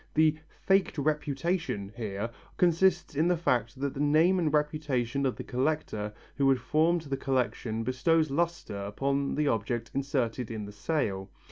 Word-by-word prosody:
The 155 Hz, 0 st, +5 dB, 0.3 s
"faked 195 Hz, -3 st, +3 dB
reputation" 150 Hz, -, -1 dB
here 110 Hz, -1 st, -3 dB, 0.3 s
consists 180 Hz, +1 st, +3 dB
in 155 Hz, +4 st, +2 dB
the 180 Hz, -1 st, +2 dB
fact 120 Hz, -7 st, 0 dB
that 140 Hz, 0 st, -1 dB
the -, -, -7 dB
name 155 Hz, +6 st, +4 dB
and 160 Hz, -4 st, +1 dB
reputation 145 Hz, -4 st, 0 dB
of 130 Hz, -, -2 dB
the -, -, -6 dB
collector 125 Hz, -6 st, -1 dB, 0.3 s
who 140 Hz, -1 st, +4 dB
had 135 Hz, -, +4 dB
formed 160 Hz, +7 st, +2 dB
the 140 Hz, -3 st, -3 dB
collection 125 Hz, -4 st, -1 dB
bestows 155 Hz, +5 st, +2 dB
lustre 170 Hz, -6 st, -1 dB
upon 140 Hz, +7 st, -1 dB
the 150 Hz, 0 st, +1 dB
object 115 Hz, 0 st, -1 dB
inserted 130 Hz, -4 st, -1 dB
in 110 Hz, -2 st, -4 dB
the 100 Hz, -, -8 dB
sale. 100 Hz, -4 st, -2 dB
140 Hz, 155 wpm, -29 LUFS, 120-155 Hz, 0.3 s, The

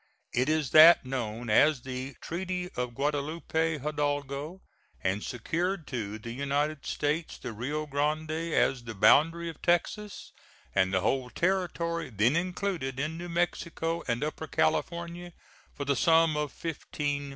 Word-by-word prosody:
It 125 Hz, +4 st, +1 dB
is 155 Hz, -4 st, +1 dB
that 160 Hz, -1 st, +9 dB
known 120 Hz, -3 st, -3 dB
as 145 Hz, +2 st, +4 dB
the 130 Hz, 0 st, -5 dB
"Treaty 180 Hz, +1 st, -3 dB
of 125 Hz, -1 st, -3 dB
Guadalupe 155 Hz, +3 st, -1 dB
Hidalgo," 145 Hz, +3 st, -2 dB, 0.4 s
and 95 Hz, +3 st, 0 dB
secured 170 Hz, -, -2 dB
to 110 Hz, -5 st, -3 dB
the 115 Hz, +2 st, -8 dB
United 140 Hz, +3 st, -1 dB
States 155 Hz, +3 st, -1 dB
the 115 Hz, -, -6 dB
Rio 145 Hz, +8 st, -3 dB
Grande 150 Hz, +2 st, -1 dB
as 155 Hz, -5 st, +1 dB
the 115 Hz, -1 st, -6 dB
boundary 165 Hz, +11 st, +4 dB
of 165 Hz, -3 st, -8 dB
Texas, 200 Hz, +4 st, -1 dB, 0.4 s
and 95 Hz, -1 st, +2 dB
the 95 Hz, -1 st, +2 dB
whole 125 Hz, +4 st, 0 dB
territory 170 Hz, -2 st, -1 dB
then 115 Hz, +5 st, +2 dB
included 175 Hz, -6 st, -2 dB
in 155 Hz, +3 st, -2 dB
New 175 Hz, +1 st, -6 dB
Mexico 170 Hz, -1 st, -1 dB
and 120 Hz, +3 st, 0 dB
Upper 155 Hz, +1 st, -4 dB
California, 170 Hz, -, -1 dB, 0.4 s
for 140 Hz, -, -4 dB
the 140 Hz, 0 st, +2 dB
sum 165 Hz, +2 st, +4 dB
of 150 Hz, -2 st, -1 dB
$15,000,000. 145 Hz, -2 st, -3 dB
150 Hz, 140 wpm, -29 LUFS, 130-170 Hz, 0.4 s, that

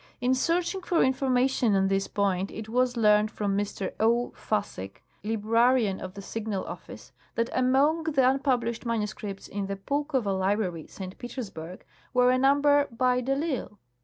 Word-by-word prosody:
In 250 Hz, +1 st, +2 dB
searching 340 Hz, +7 st, 0 dB
for 355 Hz, -2 st, +2 dB
information 255 Hz, -3 st, +2 dB
on 195 Hz, 0 st, +3 dB
this 195 Hz, 0 st, 0 dB
point 195 Hz, -1 st, 0 dB
it 220 Hz, 0 st, -7 dB
was 250 Hz, +1 st, +1 dB
learned 210 Hz, -1 st, +4 dB
from 205 Hz, -3 st, -2 dB
Mr. 200 Hz, -1 st, -3 dB
0. 235 Hz, +2 st, +2 dB
Fassig, 150 Hz, -, -4 dB, 0.2 s
librarian 225 Hz, 0 st, +2 dB
of 185 Hz, +1 st, -7 dB
the 200 Hz, -, -8 dB
Signal 215 Hz, -2 st, -4 dB
Office, -, -, -9 dB, 0.2 s
that 230 Hz, 0 st, 0 dB
among 275 Hz, +6 st, +2 dB
the 275 Hz, -5 st, +3 dB
un 265 Hz, +1 st, +3 dB
published 240 Hz, -4 st, 0 dB
manuscripts 210 Hz, -3 st, -3 dB
in 200 Hz, -1 st, -4 dB
the 195 Hz, -, -3 dB
Pulkova 270 Hz, 0 st, -1 dB
library, 190 Hz, -4 st, -1 dB
St. 185 Hz, -1 st, -8 dB
Petersburg, 195 Hz, -9 st, -7 dB, 0.3 s
were 250 Hz, 0 st, +5 dB
a 255 Hz, -, +2 dB
number 285 Hz, +1 st, +4 dB
by 250 Hz, +1 st, +1 dB
de 270 Hz, +2 st, 0 dB
I'lsle. 275 Hz, -8 st, -3 dB
230 Hz, 160 wpm, -27 LUFS, 200-260 Hz, 0.3 s, were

